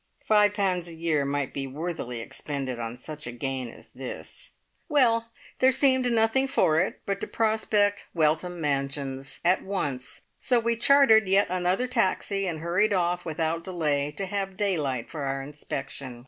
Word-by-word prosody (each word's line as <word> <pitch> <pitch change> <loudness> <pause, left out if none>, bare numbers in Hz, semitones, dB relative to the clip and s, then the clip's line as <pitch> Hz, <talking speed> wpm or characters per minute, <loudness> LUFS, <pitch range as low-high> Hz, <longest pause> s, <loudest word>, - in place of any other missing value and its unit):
Five 210 -1 +4
pounds 185 -4 0
a 170 - -8
year 160 -3 0
might 140 -1 -2
be 135 -1 -3
worthily 140 -4 -5
expended 135 0 -5
on 115 +1 -5
such 150 +3 -7
a - - -4
gain 130 +1 -3
as - - -14
this! - - -8 0.4
Well, 230 -6 +3 0.3
there 260 +1 +5
seemed 260 -1 +4
nothing 230 +4 +3
for 160 -11 +3
it 185 - -3
but 200 0 -2
to - - -3
prospect 215 -2 +1
Weltham 165 +2 0
Mansions 140 -2 -2
at 180 +2 +4
once, 145 -10 -4 0.2
so 245 -2 +2
we 235 0 0
chartered 230 -4 +5
yet 195 +2 +4
another 185 +6 +1
taxi, 195 -4 0
and 160 -3 -3
hurried 185 +6 +2
off 180 -1 0
without 165 +1 -2
delay 150 -6 -1
to 195 - -1
have 195 -1 -3
daylight 150 - -1
for 155 - -5
our 135 0 -2
inspection. 135 -2 -6
175 Hz, 160 wpm, -26 LUFS, 140-210 Hz, 0.4 s, there